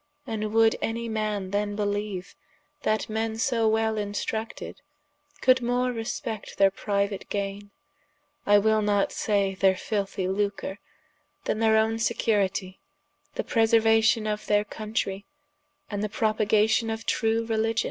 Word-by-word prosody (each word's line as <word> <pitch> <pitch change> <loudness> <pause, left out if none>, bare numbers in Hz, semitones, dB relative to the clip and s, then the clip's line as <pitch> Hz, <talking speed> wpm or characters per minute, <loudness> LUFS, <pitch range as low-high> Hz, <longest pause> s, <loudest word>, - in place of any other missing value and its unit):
And 215 -1 -3
would 225 0 +4
any 230 +1 -2
man 215 -3 -2
then 205 0 -1
beleeue, 205 -2 -3 0.5
that 215 0 0
men 220 0 -2
so 225 -1 +1
well 220 0 +1
instructed, 220 +5 -4 0.6
coulde 255 0 +5
more 245 +1 +1
respect 225 -2 -5
their 195 -1 +5
priuate 200 0 -2
gaine, 200 0 -3 0.8
I 205 0 +7
will 215 +1 +3
not 205 -1 +1
say 200 -2 0
their 190 0 +3
filthie 195 -1 -2
lucre, 200 0 -2 0.7
then 215 - -1
their 220 -1 +4
owne 220 +1 +2
securitie, 205 -5 0 0.6
the - - -1
preseruation 225 -1 +3
of 210 0 -3
their 205 0 +3
Countrey, 210 -2 -3 0.7
and 205 -1 -2
the 215 - -1
propagation 215 +1 +2
of 225 0 -4
true 225 0 +1
Religion? 225 0 0
215 Hz, 130 wpm, -26 LUFS, 205-225 Hz, 0.8 s, I